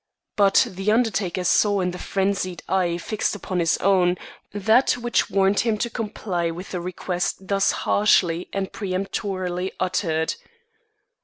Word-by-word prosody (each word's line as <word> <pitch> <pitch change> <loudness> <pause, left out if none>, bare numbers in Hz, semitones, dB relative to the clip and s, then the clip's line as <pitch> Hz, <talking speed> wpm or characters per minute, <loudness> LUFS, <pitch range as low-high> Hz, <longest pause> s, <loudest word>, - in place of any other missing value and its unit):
But 200 -1 +5
the 195 +3 -1
undertaker 210 -6 0
saw 205 +3 +3
in 180 -1 0
the 180 - -8
frenzied 195 -3 -2
eye 180 -3 +1
fixed 210 +4 -2
upon 185 -2 -3
his 165 -2 +2
own, 180 -2 +3 0.3
that 220 +5 +3
which 240 -1 0
warned 195 0 +2
him 225 -2 +1
to 235 +2 -2
comply 200 -7 -2
with 175 +3 -7
the 180 - -3
request 180 +1 -3
thus 195 -1 +3
harshly 180 -4 +2
and 195 -1 -3
peremptorily 185 -2 -3
uttered. 175 -4 0
190 Hz, 140 wpm, -23 LUFS, 180-205 Hz, 0.3 s, But